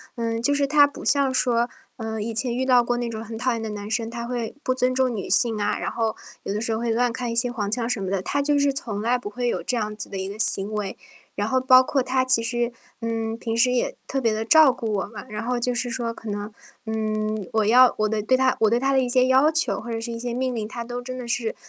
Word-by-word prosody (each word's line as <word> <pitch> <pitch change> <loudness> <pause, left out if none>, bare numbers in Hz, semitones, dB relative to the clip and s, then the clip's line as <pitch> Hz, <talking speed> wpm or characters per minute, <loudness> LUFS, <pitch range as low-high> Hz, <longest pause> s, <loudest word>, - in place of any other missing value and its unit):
嗯， 230 -1 -2
就 285 +5 +2
是 285 0 +2
他 290 +1 +5
不 285 - -10
像 280 -2 +2
说， 240 -2 +2 0.3
呃， 220 -1 -4
以 230 +1 -4
前 235 +2 0
遇 260 +1 -1
到 250 -2 +5
过 240 0 -1
那 240 -1 -2
种 220 -1 -5
很 225 0 -7
讨 255 +3 0
厌 230 -1 -2
的 220 -1 -4
男 205 0 -6
生， 225 0 0
他 235 0 -5
会 235 -1 -4
不 255 - +1
尊 255 0 0
重 260 -1 +2
女 205 -4 -5
性 230 -3 +3
啊， 205 - 0
然 - - -3
后 225 -2 -1 0.3
有 195 - -3
的 210 - -2
时 225 - -1
候 220 - -1
会 235 0 -2
乱 240 +2 +2
开 245 +1 -4
一 230 - -3
些 245 +1 +3
黄 210 -5 -3
腔 230 +2 -1
什 220 -4 -1
么 190 - -3
的， 195 -1 -1
他 285 +9 -1
就 290 +1 +2
是 285 0 +3
从 225 -7 -4
来 240 +3 +2
不 245 -4 -7
会 245 +3 -2
有 - - -2
这 250 - -1
样 215 -2 -2
子 210 - -6
的 195 - -6
一 190 0 -3
个 205 +2 -8
行 200 -1 +2
为。 210 -2 -3 0.4
然 205 +1 -2
后 260 +3 +1
包 255 0 +7
括 265 0 0
他 255 0 +1
其 255 -3 +3
实， 240 +1 -1 0.3
嗯， 225 -1 -3
平 230 -1 -3
时 250 +2 +4
也 250 - 0
特 270 - -2
别 230 -4 +1
地 215 +1 -2
照 305 +4 +7
顾 230 -3 -4
我 200 -2 -1
嘛， 215 +1 -9
然 210 +1 -5
后 250 +1 -1
就 245 +1 0
是 245 0 -1
说 235 -1 -3
可 225 -1 -9
能， 205 +1 -4 0.3
嗯， 215 -2 -2
我 220 -1 +2
要 250 +3 +6
我 215 0 +2
的 220 -1 -1
对 235 +5 +2
他 260 0 +2
我 220 - +4
对 235 - +2
他 270 +2 +1
的 270 - +3
一 255 - 0
些 250 +1 +3
要 265 +4 +5
求， 310 -11 0
或 235 - -8
者 225 -1 -2
是 230 +1 -5
一 230 - -5
些 240 0 -3
命 255 +1 -1
令， 220 -3 -3
他 235 +1 -6
都 245 +1 -5
真 255 +1 -6
的 250 - -6
是， 235 -2 -1
235 Hz, 315 characters per minute, -24 LUFS, 220-255 Hz, 0.4 s, 包